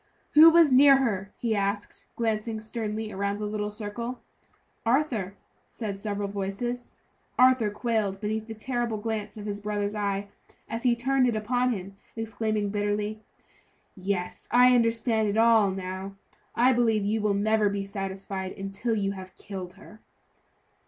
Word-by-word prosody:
"Who 315 +2 +9
was 330 -3 +6
near 275 +1 +8
her?" 205 -7 -1
he 230 -2 0
asked, 200 +1 -3
glancing 220 -1 -1
sternly 220 -1 -4
around 200 +1 -2
the 210 - -4
little 210 0 -2
circle. 225 +4 -5 0.6
"Arthur," 230 -6 0 0.3
said 205 -4 -5
several 205 -1 -3
voices. 200 +5 -4 0.4
Arthur 255 -4 +5
quailed 210 -3 -1
beneath 220 +1 -3
the 225 - -7
terrible 240 0 -2
glance 215 -1 -4
of 210 - -7
his 205 -1 -4
brother's 205 0 -2
eye, 200 -1 -2 0.4
as 230 +1 -4
he 245 -1 +3
turned 260 +2 +2
it 235 - 0
upon 245 +4 +1
him, 195 -2 -6 0.2
exclaiming 215 -2 -2
bitterly: 205 +1 -1 0.8
"Yes, 185 -1 -3
I 250 +1 +6
understand 230 -2 +2
it 205 +1 -1
all, 225 -3 +5
now! 190 +1 -5 0.4
I 250 +2 +5
believe 225 -4 +2
you 215 +2 0
will 205 -1 +1
never 215 +1 +2
be 200 0 -2
satisfied 195 -1 -5
until 195 +4 -3
you 200 -2 0
have 185 -1 -9
killed 185 -3 -7
her." 210 +2 -15
215 Hz, 150 wpm, -27 LUFS, 200-230 Hz, 0.8 s, Who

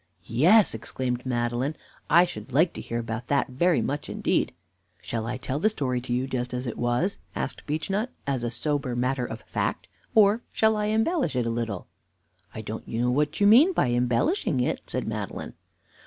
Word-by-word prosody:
"Yes," 175 - +5
exclaimed 125 +2 -3
Madeline, 120 +4 -1 0.3
"I 170 +3 +7
should 175 - -8
like 160 +7 +3
to - - -6
hear 115 - -4
about 115 +1 -4
that 140 -1 +1
very 170 +7 +2
much 145 +1 -3
indeed." - - 0 0.5
"Shall 115 -1 -4
I 125 +1 -2
tell 130 +2 -3
the 215 - +3
story 130 - -1
to 120 0 -7
you 125 +2 +1
just 125 -1 -3
as 125 +1 -3
it 120 - -3
was," 120 +11 0 0.2
asked - - -4
Beechnut, 195 - -1 0.2
"as 135 -3 -1
a 120 - 0
sober 135 +1 -1
matter 125 0 0
of 110 - -7
fact, - - -2 0.3
or 215 +1 +5
shall 220 0 +3
I 210 0 0
embellish 225 - +1
it 125 -2 +1
a 115 - 0
little?" 115 -5 -3 0.7
"I - - -6
don't - - -6
know 120 +2 0
what 150 +4 0
you 205 - +4
mean 265 - +7
by 125 - +2
embellishing 125 - +1
it," 125 - 0
said - - -3
Madeline. - - -4
130 Hz, 185 wpm, -26 LUFS, 120-180 Hz, 0.7 s, I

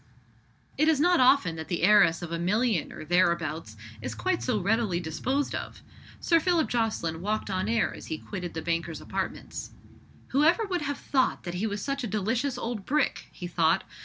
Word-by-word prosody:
It 310 - +4
is 315 -3 +4
not 350 +3 +4
often 250 -10 +4
that 160 - -6
the 175 -2 -2
heiress 175 -4 +5
of 170 - -6
a 170 - -2
million 205 0 +1
or - - -8
thereabouts 165 -8 +1 0.2
is - - -5
quite 370 -1 -1
so 245 -5 0
readily 205 -2 +1
disposed 250 - -2
of. - - -6 0.4
Sir 335 -1 +3
Philip 340 -1 +2
Jocelyn 215 -9 -1
walked 210 +1 -2
on 190 +2 -1
air 230 0 +1
as - - -10
he 160 - -3
quitted 180 -1 -6
the 160 - -4
banker's 170 -1 -2
apartments. - - -5 0.6
"Who 280 +3 +2
ever 345 +8 +4
would 365 -4 -2
have 285 -1 -2
thought 260 -2 0
that 175 - -5
he 190 +5 -1
was 205 -1 -4
such 275 -1 -2
a - - -1
delicious 225 +6 -1
old 230 -4 -4
brick?" 295 +6 0
he 180 - -8
thought. 165 -2 +2
210 Hz, 190 wpm, -28 LUFS, 170-270 Hz, 0.6 s, heiress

